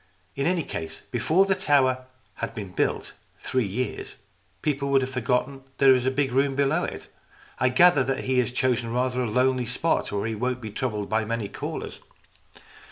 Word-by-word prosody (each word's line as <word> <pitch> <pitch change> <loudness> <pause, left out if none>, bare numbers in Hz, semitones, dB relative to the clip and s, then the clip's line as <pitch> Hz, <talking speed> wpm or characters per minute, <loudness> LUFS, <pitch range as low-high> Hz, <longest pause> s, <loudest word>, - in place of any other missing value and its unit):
In 140 +2 0
any 175 -2 +1
case, 80 -8 -6
before 155 +11 +3
the 195 - +2
tower 130 -6 +2 0.3
had 115 - -4
been 100 -4 -6
built - - -1 0.2
three 130 -5 -1
years, 125 +7 -4 0.5
people 140 -2 0
would 135 -1 +4
have 130 - -4
forgotten 125 +2 0
that 135 0 -31
there 135 -1 +7
is 125 -1 +1
this 130 - +1
big 140 -2 +1
room 135 +1 +2
below 140 0 +2
it. - - -6 0.5
I 130 - +3
gather 145 +2 +5
that 135 0 -2
he 130 -1 +1
has 125 0 +1
chosen 125 -2 0
rather 125 +1 0
a 120 - -1
lonely 125 +1 +1
spot 125 +7 0
where 100 0 -2
he 115 - -2
won't 125 +3 -2
be 110 -3 -7
troubled 105 -3 -3
by 110 +1 +1
many 110 -1 -2
callers." - - -6
130 Hz, 190 wpm, -25 LUFS, 115-135 Hz, 0.5 s, there